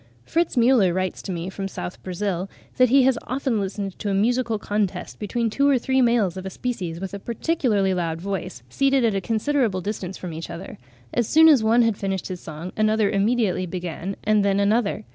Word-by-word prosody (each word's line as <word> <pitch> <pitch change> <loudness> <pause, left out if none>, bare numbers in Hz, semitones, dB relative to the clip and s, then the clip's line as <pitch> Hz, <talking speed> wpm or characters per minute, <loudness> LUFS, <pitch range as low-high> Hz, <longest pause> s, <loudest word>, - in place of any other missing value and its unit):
Fritz 340 0 0
Müller 230 -7 +4
writes 185 0 -2
to 195 - -6
me 170 0 -4
from 195 +1 -5
S. 185 -2 -5
Brazil 185 0 -3 0.3
that 255 -1 +5
he 270 +2 +5
has 255 -2 +3
often 255 -3 -1
listened 195 -1 -4
to 210 - -2
a 195 - +1
musical 230 +2 +1
contest 205 -3 -3
between 230 +3 -1
two 280 +6 +2
or 275 - +4
three 265 +2 +1
males 230 -7 +2
of 185 - -5
a 190 - -4
species 185 -8 -4
with 190 +1 -6
a 200 - -5
particularly 225 - 0
loud 165 -3 -2
voice, 180 -9 -5
seated 270 - +2
at 220 - +2
a 195 - -1
considerable 225 -2 0
distance 190 -1 -5
from 180 -3 -6
each 160 +1 -6
other: 170 +3 -8 0.3
as 240 -3 +1
soon 320 +1 +7
as 285 -8 +6
one 230 +2 +4
had 225 -3 +1
finished 195 -1 -3
his 180 -2 -6
song, 160 +3 -7
another 215 -1 +2
immediately 205 -3 +1
began, 180 +2 -5
and 215 -1 +3
then 200 0 +2
another. 210 +1 +1
205 Hz, 205 wpm, -23 LUFS, 185-240 Hz, 0.3 s, soon